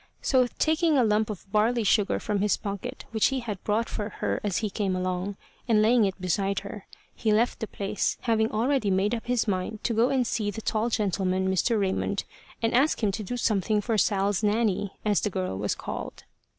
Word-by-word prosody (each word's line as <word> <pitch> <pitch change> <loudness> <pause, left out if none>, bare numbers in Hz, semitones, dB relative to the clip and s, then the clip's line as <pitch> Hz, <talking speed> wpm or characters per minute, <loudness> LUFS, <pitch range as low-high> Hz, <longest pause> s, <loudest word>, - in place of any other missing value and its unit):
So 255 -2 +3
taking 315 -1 +2
a 255 - +5
lump 215 0 +2
of 210 -4 -6
barley 225 +3 +2
sugar 205 0 +2
from 205 -2 -1
his 210 0 +2
pocket, 200 -2 -6
which 220 -2 +3
he 265 -1 -1
had 210 -5 -6
bought 220 +2 0
for 210 -1 -4
her - - -2
as 200 -4 0
he 215 -3 -2
came 195 -2 -1
along, 185 +2 -2 0.3
and 225 -3 +4
laying 225 +1 +4
it 195 0 -3
beside 195 +2 0
her, 200 0 -9 0.3
he 220 - 0
left 225 +3 +2
the 220 - -3
place, 200 0 -2
having 225 -2 +1
already 235 0 +1
made 195 +3 +1
up 230 -1 -4
his 245 -2 +1
mind 200 +2 -2
to 235 - 0
go 230 +3 +3
and 260 -2 +1
see 215 -2 -1
the 205 - -5
tall 220 +1 0
gentleman, 190 -4 0
Mr. 215 +4 +2
Raymond, 195 0 -1 0.4
and 225 - +1
ask 265 0 +2
him 205 - +3
to 215 - -4
do 230 +5 -4
something 210 -2 +1
for 225 +2 -1
Sal's 200 -1 +1
Nanny, 210 -2 +1
as 210 -2 +2
the 210 - 0
girl 185 - -3
was 100 +1 -1
called. - - -6
210 Hz, 210 wpm, -27 LUFS, 195-230 Hz, 0.4 s, a